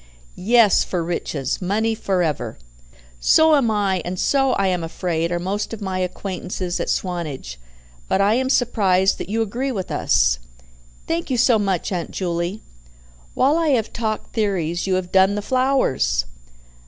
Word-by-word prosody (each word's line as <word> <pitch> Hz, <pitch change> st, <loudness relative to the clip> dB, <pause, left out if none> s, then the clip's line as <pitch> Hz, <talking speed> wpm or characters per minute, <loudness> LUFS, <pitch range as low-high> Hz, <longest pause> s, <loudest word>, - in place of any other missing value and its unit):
"Yes. 220 Hz, +2 st, +4 dB
For 175 Hz, -2 st, -2 dB
riches. 160 Hz, -5 st, -3 dB
Money 215 Hz, +5 st, 0 dB
for 190 Hz, -4 st, 0 dB
ever!" 155 Hz, -4 st, -3 dB, 0.6 s
"So 315 Hz, -, +5 dB
am 265 Hz, -6 st, +2 dB
I, 200 Hz, -4 st, 0 dB
and 180 Hz, +1 st, -4 dB
so, 270 Hz, +5 st, +2 dB
I 195 Hz, -, +1 dB
am 180 Hz, -3 st, 0 dB
afraid, 165 Hz, 0 st, -2 dB
are 175 Hz, -, 0 dB
most 200 Hz, +5 st, -3 dB
of -, -, -13 dB
my 190 Hz, -3 st, -3 dB
acquaintances 185 Hz, -1 st, -4 dB
at -, -, -2 dB
Swanage, 155 Hz, -, -3 dB, 0.5 s
but -, -, +1 dB
I 200 Hz, +2 st, +3 dB
am 260 Hz, +2 st, 0 dB
surprised 195 Hz, -7 st, +2 dB
that -, -, -6 dB
you 225 Hz, +2 st, +1 dB
agree 245 Hz, +6 st, -3 dB
with 195 Hz, -6 st, -4 dB
us." -, -, +2 dB, 0.7 s
"Thank 330 Hz, -1 st, -2 dB
you 255 Hz, -, 0 dB
so 235 Hz, -1 st, +4 dB
much, 195 Hz, -3 st, -1 dB
Aunt 175 Hz, -3 st, -3 dB
Juley. 175 Hz, +2 st, -3 dB, 0.7 s
While 285 Hz, +5 st, +3 dB
I 330 Hz, -, +1 dB
have 220 Hz, -1 st, -4 dB
talked 220 Hz, -2 st, -3 dB
theories, 185 Hz, -5 st, -1 dB
you 190 Hz, -, +2 dB
have 185 Hz, -1 st, -3 dB
done 190 Hz, +1 st, +4 dB
the 210 Hz, -, -2 dB
flowers." 255 Hz, -, +1 dB
195 Hz, 165 wpm, -21 LUFS, 175-225 Hz, 0.7 s, So